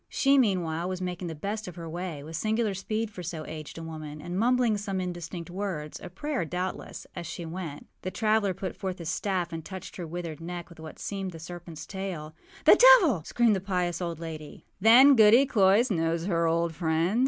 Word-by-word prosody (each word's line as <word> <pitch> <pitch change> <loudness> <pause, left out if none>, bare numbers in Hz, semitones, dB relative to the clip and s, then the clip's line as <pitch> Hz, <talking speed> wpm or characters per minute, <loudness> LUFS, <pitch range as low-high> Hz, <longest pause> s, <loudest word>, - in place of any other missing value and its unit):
She, 275 0 +4
meanwhile, 180 -7 +1
was 185 -1 -3
making 180 -1 -4
the 165 - -5
best 205 +7 -4
of 180 - -8
her 170 -2 -7
way, 165 -3 -5
with 160 +2 -7
singular 220 +2 0
speed 215 +3 -3
for 185 - -8
so 160 -2 -5
aged 155 0 -8
a 165 - -6
woman, 155 -2 -7
and 175 +3 -6
mumbling 240 +1 +3
some 200 -2 -3
indistinct 175 -1 -5
wordsâa 180 -3 -5
prayer, 295 - -2
doubtlessâas 180 +1 -5
she 170 - -6
went. 165 -3 -6 0.2
The 185 - -3
traveller 215 -2 +1
put 190 0 -5
forth 190 -2 -4
his 170 -2 -5
staff 180 -4 -1
and 165 -1 -5
touched 190 +3 -8
her 175 -3 -5
withered 165 -1 -6
neck 175 0 -6
with 170 - -15
what 160 -1 -9
seemed 195 -2 -4
the - - -8
serpentâs 165 -1 -8
tail. 185 -6 -5 0.3
âThe - - +8
devil!â 375 - +7
screamed 235 -3 +3
the 190 - -2
pious 180 -3 -1
old 170 -2 -3
lady. 155 -3 -8 0.2
âThen 255 +6 +8
Goody 225 +4 +7
Cloyse 215 0 +4
knows 165 -1 0
her 170 -3 +1
old 165 0 +1
friend? 165 +6 +1
180 Hz, 200 wpm, -28 LUFS, 165-205 Hz, 0.3 s, âThe